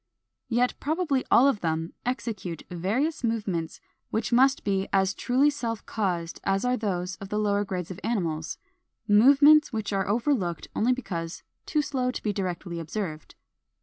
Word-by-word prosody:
Yet 245 Hz, +1 st, +2 dB
probably 305 Hz, -3 st, 0 dB
all 260 Hz, -, +6 dB
of 270 Hz, -7 st, +2 dB
them 160 Hz, 0 st, -2 dB
execute 210 Hz, -, -3 dB
various 225 Hz, -, -1 dB
movements 200 Hz, -8 st, -2 dB, 0.3 s
which 225 Hz, +2 st, -1 dB
must 265 Hz, +3 st, +4 dB
be 195 Hz, -1 st, 0 dB
as 190 Hz, 0 st, +2 dB
truly 265 Hz, +8 st, +2 dB
self 230 Hz, -6 st, -4 dB
caused 175 Hz, -6 st, -2 dB
as 195 Hz, +3 st, 0 dB
are 250 Hz, 0 st, +2 dB
those 185 Hz, -5 st, -2 dB
of 195 Hz, -, -9 dB
the 210 Hz, -, -2 dB
lower 205 Hz, -1 st, +1 dB
grades 185 Hz, -3 st, -4 dB
of 185 Hz, -, -7 dB
animals, 170 Hz, -9 st, -2 dB, 0.5 s
movements 280 Hz, +8 st, +6 dB
which 215 Hz, -3 st, -3 dB
are 195 Hz, -1 st, 0 dB
overlooked 210 Hz, -, 0 dB
only 240 Hz, +4 st, +2 dB
because 180 Hz, -10 st, -4 dB, 0.2 s
too 300 Hz, -1 st, +1 dB
slow 260 Hz, -3 st, -1 dB
to 255 Hz, -, -5 dB
be 210 Hz, -, 0 dB
directly 180 Hz, -3 st, -3 dB
observed. 160 Hz, -2 st, -5 dB
210 Hz, 155 wpm, -27 LUFS, 180-250 Hz, 0.5 s, all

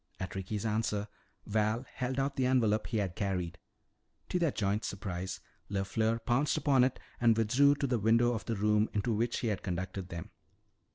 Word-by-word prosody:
At 95 Hz, -, -4 dB
Ricky's 100 Hz, +2 st, -3 dB
answer, 105 Hz, -1 st, 0 dB, 0.4 s
Val 110 Hz, +3 st, 0 dB
held 130 Hz, +1 st, -2 dB
out 135 Hz, +1 st, 0 dB
the 130 Hz, -1 st, +1 dB
envelope 110 Hz, -5 st, +2 dB
he 115 Hz, -, -1 dB
had 95 Hz, -4 st, -1 dB
carried. 90 Hz, -5 st, -2 dB, 0.7 s
To 180 Hz, -, 0 dB
their 170 Hz, -2 st, +3 dB
joint 100 Hz, 0 st, 0 dB
surprise, 95 Hz, -1 st, -4 dB, 0.3 s
LeFleur 110 Hz, +3 st, 0 dB
pounced 135 Hz, +5 st, +2 dB
upon 140 Hz, -4 st, +4 dB
it 130 Hz, 0 st, +1 dB, 0.2 s
and 115 Hz, -2 st, +4 dB
withdrew 130 Hz, +6 st, +4 dB
to 140 Hz, -, -1 dB
the 125 Hz, -3 st, +1 dB
window 115 Hz, +3 st, +4 dB
of 115 Hz, -, -4 dB
the 115 Hz, -, -1 dB
room 105 Hz, +1 st, +2 dB
into 105 Hz, +3 st, 0 dB
which 115 Hz, +2 st, 0 dB
he 115 Hz, -, 0 dB
had 105 Hz, -, -2 dB
conducted 90 Hz, +1 st, -4 dB
them. 85 Hz, -1 st, -7 dB
110 Hz, 180 wpm, -32 LUFS, 100-120 Hz, 0.7 s, upon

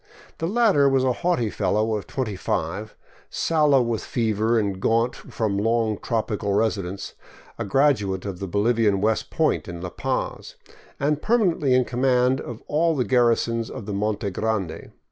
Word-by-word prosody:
The 165 Hz, -, -1 dB
latter 200 Hz, -9 st, +4 dB
was 135 Hz, -1 st, +2 dB
a 130 Hz, -1 st, +2 dB
haughty 125 Hz, -, 0 dB
fellow 110 Hz, +2 st, 0 dB
of 105 Hz, -, -5 dB
twenty 120 Hz, -7 st, -3 dB
five, 95 Hz, +4 st, -3 dB, 0.3 s
sallow 150 Hz, -5 st, +3 dB
with 115 Hz, -2 st, -2 dB
fever 110 Hz, 0 st, 0 dB
and 100 Hz, -3 st, -1 dB
gaunt 115 Hz, +4 st, +2 dB
from 105 Hz, -3 st, -3 dB
long 110 Hz, -1 st, +1 dB
tropical 110 Hz, -3 st, -2 dB
residence, 100 Hz, -3 st, -1 dB, 0.5 s
a -, -, -2 dB
graduate 105 Hz, -6 st, +1 dB
of 95 Hz, -3 st, -5 dB
the 95 Hz, -, -4 dB
Bolivian 105 Hz, +1 st, +2 dB
West 110 Hz, +2 st, 0 dB
Point -, -, 0 dB
in 85 Hz, -1 st, -6 dB
La 90 Hz, +1 st, -5 dB
Paz, -, -, -3 dB, 0.4 s
and 150 Hz, +1 st, 0 dB
permanently 180 Hz, -, +2 dB
in 125 Hz, -1 st, +3 dB
command 125 Hz, +1 st, +2 dB
of 120 Hz, -2 st, -8 dB
all 165 Hz, +2 st, +1 dB
the 125 Hz, -4 st, 0 dB
garrisons 115 Hz, 0 st, +2 dB
of 105 Hz, -, -7 dB
the 105 Hz, -, -4 dB
Monte 105 Hz, 0 st, -1 dB
Grande. 105 Hz, -4 st, -3 dB
115 Hz, 160 wpm, -24 LUFS, 105-130 Hz, 0.5 s, latter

